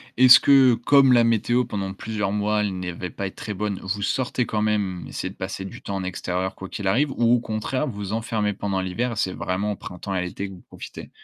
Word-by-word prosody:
est-ce 125 -1 +9
que 135 -3 +6
comme 135 +3 +5
la 120 -2 +5
météo 120 +2 +2
pendant 100 -4 -4
plusieurs 105 -1 -3
mois, 105 +1 +1
elle 100 -3 -2
n'avait 90 0 -5
pas 100 +3 -4
être 95 - -10
très 105 - -5
bonne, 100 0 -3
vous 100 +2 -3
sortez 125 +3 0
quand 105 -2 -2
même, 105 -4 -1
essayez - - -4
de - - -12
passer 95 +1 -5
du 95 - -9
temps 100 - -5
en 95 - -4
extérieur 90 0 -3
quoi 95 - -8
qu'il 100 - -4
arrive 135 +9 +2
ou 120 -2 +2
au - - +1
contraire 115 +5 -2
vous 140 - -3
vous 100 0 -4
enfermez 110 -2 -1
pendant 100 -1 -2
l'hiver, 110 +6 -2
c'est 95 -3 0
vraiment 100 +4 -2
au - - -7
printemps 95 +1 -6
et 90 - 0
l'été 90 +2 -4
que 95 - -10
vous 90 - -14
profitez? - - -10
105 Hz, 240 wpm, -24 LUFS, 95-115 Hz, -, est-ce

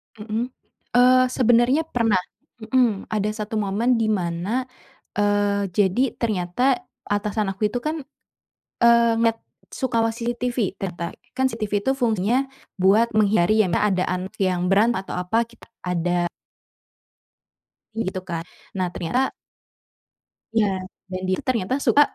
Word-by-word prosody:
Mhm. 220 +2 -3 0.5
Eee, 255 +1 +6
sebenernya 250 +4 +3
pernah, 230 -10 +1 0.4
mhm. 235 -4 +1
Ada 215 0 -1
1 215 +1 -3
momen 225 +4 +1
di 225 - +1
mana 195 +4 -1 0.5
eee, 205 -1 +2
jadi 205 +7 +2
ternyata 230 +4 0 0.3
atasan 205 0 0
aku 205 +2 0
itu 245 - -1
kan, 310 +1 -2 0.9
eee, 235 0 +6
ngelihat 230 0 +2 0.3
suka 255 -4 -1
mengawasi 230 +1 -1
CCTV, 245 0 -3 0.2
ternyata. 175 -3 -4 0.2
Kan 260 - +2
CCTV 215 -3 -4
itu 265 - +2
fungsinya 235 +2 +1 0.3
buat 205 +5 +4
menghindari 215 0 +4
ya - - 0
misal 205 - +2
ada 185 0 +1
anak 185 +2 -3
yang 180 -1 +1
berantem, 225 +4 +4
atau - - -7
apa, 200 +6 +1
kita 235 0 -18 0.2
ada. 175 0 0 1.7
Gitu 190 -4 -2
kan. 165 -1 -3 0.3
Nah 185 -1 0
ternyata 245 +11 -1 1.2
Iya, 220 -2 +4 0.4
dan 185 0 -3
dia 185 - +2
itu - - -9
ternyata 235 -1 0
suka 290 - +6
215 Hz, 135 wpm, -23 LUFS, 190-240 Hz, 1.7 s, Eee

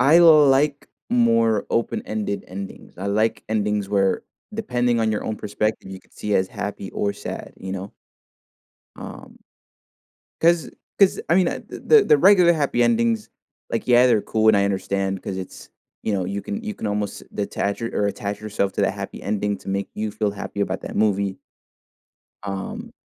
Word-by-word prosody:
I 145 +6 +6
like 150 -3 +5 0.2
more 115 -3 +3
open-ended 105 -3 -2
endings, 95 -1 -9
I 95 - -4
like 110 +3 +1
endings 105 -2 0
where, 100 -1 +1 0.3
depending 125 - 0
on 110 -1 +2
your 105 - -2
own 110 - -3
perspective, 105 -1 -2
you 95 -1 -8
could - - -30
see 105 -1 -3
as 95 -1 +2
happy 100 -1 -5
or 100 - -1
sad, - - -7
you 95 0 -6
know? 95 +1 -6 1.0
Um - - -10 1.0
'cause 170 -1 +3 0.3
'cause, 195 -2 +5
I 170 - +5
mean, 185 -2 +4
uh, - - -2
the 445 -2 +4
the 150 - +5
regular 180 +1 +6
happy 140 -6 +1
endings, 115 -2 +1 0.4
like, 115 - -2
yeah, 125 0 +6
they're 115 -4 +3
cool, 110 +1 0
and 110 -2 +6
I 100 - +3
understand 95 -1 -1
'cause 95 -2 -5
it's, 95 -1 -8 0.3
you 110 - 0
know, 95 -2 0
you 100 +2 -3
can 210 - -5
you 215 -1 -4
can 150 - -5
almost 105 -1 -3
detach 100 0 -2
or 115 -3 -1
a - - +2
attach 100 0 -5
yourself 100 -2 -1
to - - -1
that - - +2
happy - - -7
ending 105 0 -1
to - - -8
make 100 +1 -2
you 110 0 -3
feel 105 -1 -1
happy 100 0 -5
about 95 -1 -2
that - - -7
movie. 100 -2 +1 1.1
Um 95 -1 -5
105 Hz, 175 wpm, -23 LUFS, 100-120 Hz, 1.1 s, I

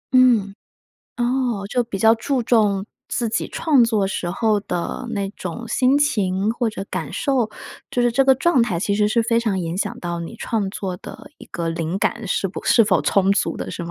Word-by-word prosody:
嗯， 230 -6 +4 0.6
哦， 240 -4 0
就 245 +1 +1
比 215 -4 -5
较 225 +2 +5
注 250 +3 -1
重 210 -4 +2 0.2
自 235 -2 -1
己 - - -2
创 290 -7 +3
作 215 -4 +2
时 175 -2 -3
候 215 0 +1
的 180 +6 -4
那 200 -3 -2
种 205 +5 -7
心 255 +4 +3
情， 205 -6 +1
或 235 -2 -1
者 195 -2 -6
感 - - -4
受。 255 -6 0 0.4
就 250 - -1
是 240 -1 +2
这 270 +2 +3
个 265 -1 +5
状 275 -3 +3
态， 190 -8 -1
其 200 +2 0
实 210 0 +2
是 230 +2 +2
非 230 0 +2
常 215 -5 -1
影 170 0 -3
响 - - -3
到 170 -1 -4
你 170 +7 -7
创 215 -4 -2
作 185 -3 -4
的 - - -11
一 - - -11
个 170 -1 -4
灵 165 +3 -2
感 230 +2 -1
是 195 - 0
不 185 - -7
是 230 - +5
否 190 -4 +2
充 195 0 +3
足 - - 0
的， - - -5
是 170 - -5
吗？ 170 - -6
215 Hz, 230 characters per minute, -21 LUFS, 195-240 Hz, 0.6 s, 较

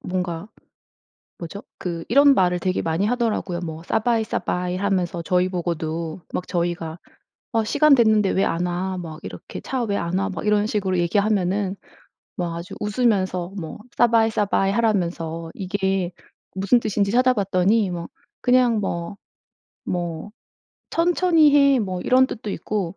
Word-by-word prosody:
뭔가 180 +1 -3 0.9
뭐죠? 175 +5 -8
그 170 -2 -5
이런 280 +4 +6
말을 180 -5 +2
되게 185 +1 -1
많이 165 +5 0
하더라고요. 220 -7 -1
뭐 160 -1 -6
"สบาย 225 +4 +1
สบาย" 180 -3 -2
하면서 185 -3 -1
저희 180 0 +1
보고도 170 -1 -3
막 180 - -3
저희가 170 -1 -2 0.5
어 225 -1 +1
"시간 290 +6 +5
됐는데 215 -5 +4
왜 195 - +2
안 170 +2 0
와?" 185 +2 -2
막 160 -3 -7
이렇게 - - -8
"차 260 -2 -3
왜 200 -2 -1
안 170 +2 -1
와?" 195 +1 0
막 195 +2 -5
이런 210 0 +3
식으로 190 -4 -1
얘기하면은 195 +1 +1 0.6
막 170 -2 -3
아주 170 +1 -7
웃으면서 195 -5 0
뭐 160 -4 -6 0.2
"สบาย 230 -2 +4
สบาย" 200 -2 +1
하라면서 170 -7 -1
이게 190 -1 -1 0.4
무슨 200 +6 +3
뜻인지 200 -1 0
찾아봤더니 210 -4 +2
뭐 170 -1 -5 0.3
그냥 245 -3 +3
뭐 175 0 -3 0.7
뭐 175 +1 -3 0.6
"천천히 335 -3 +4
해." 280 -2 +5
뭐 185 -4 -2
이런 260 +5 +4
뜻도 220 -4 -7
있고 195 -3 -3
190 Hz, 300 characters per minute, -23 LUFS, 175-220 Hz, 0.9 s, 이런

